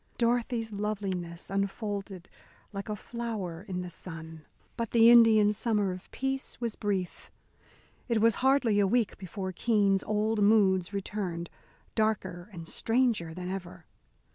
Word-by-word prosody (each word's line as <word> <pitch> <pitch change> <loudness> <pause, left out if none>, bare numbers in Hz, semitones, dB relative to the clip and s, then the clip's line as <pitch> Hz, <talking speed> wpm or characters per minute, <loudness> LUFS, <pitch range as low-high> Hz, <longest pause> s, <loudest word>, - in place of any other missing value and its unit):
Dorothy's 235 -1 0
loveliness 195 -5 -3
unfolded 195 -1 -3 0.5
like 200 +1 -5
a 210 - -1
flower 210 -7 -5
in 185 -2 -4
the 180 - -6
sun. 160 -3 -7 0.3
But 230 -2 -3
the 230 0 +7
Indian 220 -3 +7
summer 210 -3 0
of 180 +1 -9
peace 270 0 -3
was 235 -3 -2
brief. 195 -4 -3 0.8
It 230 -3 +2
was 230 +1 +5
hardly 260 -5 +3
a 200 - +4
week 230 0 +1
before 190 0 -5
Keene's 200 -1 +2
old 215 +1 0
moods 200 -3 +4
returned, 185 -4 -4 0.4
darker 195 -5 -1
and 170 -4 -8
stranger 225 -9 +1
than 180 0 -5
ever. 180 -2 -6
205 Hz, 135 wpm, -29 LUFS, 185-225 Hz, 0.8 s, the